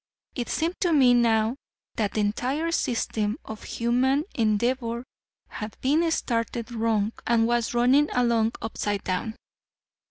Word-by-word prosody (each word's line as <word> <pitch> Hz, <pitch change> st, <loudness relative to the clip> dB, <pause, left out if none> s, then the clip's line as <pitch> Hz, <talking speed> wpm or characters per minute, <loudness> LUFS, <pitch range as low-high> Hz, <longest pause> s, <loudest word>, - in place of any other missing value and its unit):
It 245 Hz, -3 st, -4 dB
seemed 335 Hz, +3 st, -1 dB
to 350 Hz, -3 st, +2 dB
me 260 Hz, -5 st, +6 dB
now 230 Hz, 0 st, +2 dB, 0.4 s
that 210 Hz, -3 st, -1 dB
the 215 Hz, -, 0 dB
entire 260 Hz, +10 st, -1 dB
system 225 Hz, -6 st, -1 dB
of 220 Hz, -1 st, -8 dB
human 255 Hz, +5 st, +1 dB
endeavor 235 Hz, +2 st, 0 dB, 0.4 s
had 210 Hz, 0 st, -7 dB
been 310 Hz, +6 st, +2 dB
started 235 Hz, -5 st, -2 dB
wrong 220 Hz, -2 st, 0 dB, 0.2 s
and 230 Hz, -1 st, +3 dB
was 240 Hz, 0 st, 0 dB
running 260 Hz, +5 st, +4 dB
along 235 Hz, -2 st, +2 dB
upside 205 Hz, -2 st, -2 dB
down. 190 Hz, +4 st, -2 dB
235 Hz, 130 wpm, -26 LUFS, 220-260 Hz, 0.4 s, me